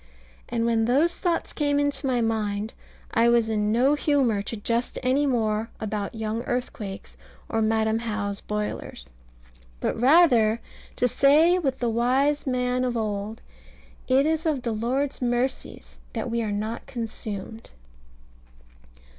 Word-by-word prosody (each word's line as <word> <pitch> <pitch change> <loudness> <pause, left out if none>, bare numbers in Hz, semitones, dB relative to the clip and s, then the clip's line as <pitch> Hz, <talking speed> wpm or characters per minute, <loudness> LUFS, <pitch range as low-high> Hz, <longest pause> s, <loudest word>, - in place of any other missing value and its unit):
And 230 -1 0
when 225 -1 +2
those 290 +9 +3
thoughts 345 -2 -1
came 285 -1 +1
into 285 -1 0
my 250 -2 +1
mind, 215 -1 -1 0.4
I 230 +1 +4
was 235 -2 +3
in 210 -1 0
no 255 +6 +3
humour 275 -8 +2
to 220 +3 -4
jest 230 +3 -1
any 270 +3 +2
more 225 -3 0
about 210 0 -3
"young 220 +1 -2
earthquakes," 225 -5 -4 0.3
or 225 - -1
"Madam 220 0 +1
How's 210 -3 -3
boilers;" 210 - -5 0.7
but - - -1
rather 245 -6 +5 0.4
to 250 - +2
say 310 +8 +4
with 270 -6 -1
the 240 - -1
wise 265 +6 +1
man 250 0 0
of 245 -2 -1
old, 215 0 -3 0.6
"It 265 +2 +4
is 320 +1 0
of 285 -5 0
the 235 - -1
Lord's 260 +6 -1
mercies 245 +2 -2
that 230 0 -3
we 235 0 0
are 215 -2 -2
not 215 +5 -4
consumed." 225 -3 -6
235 Hz, 140 wpm, -25 LUFS, 220-265 Hz, 0.7 s, rather